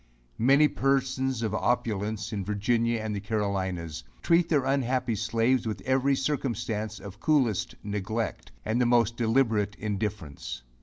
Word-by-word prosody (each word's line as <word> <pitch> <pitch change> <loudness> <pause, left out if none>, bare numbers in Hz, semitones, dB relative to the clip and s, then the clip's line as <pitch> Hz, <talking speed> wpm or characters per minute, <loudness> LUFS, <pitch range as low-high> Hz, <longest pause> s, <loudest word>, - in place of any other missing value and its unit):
Many 140 +6 +6
persons 130 -3 0
of 110 -2 -1
opulence 110 -1 -1
in 100 -2 -2
Virginia, 115 +3 +1
and 110 -1 -3
the - - -2
Carolinas, 95 -6 -2 0.2
treat 170 0 +3
their 145 -5 +2
unhappy 130 -2 +1
slaves 115 +3 +1
with 105 -4 -3
every 135 +3 +2
circumstance 120 -6 -2
of 100 -2 -10
coolest 130 - +1
neglect, 105 +2 -3
and 110 +3 +1
the 120 - +3
most 120 -2 +3
deliberate 110 -4 +1
indifference. 100 - -4
115 Hz, 135 wpm, -28 LUFS, 105-130 Hz, 0.2 s, Many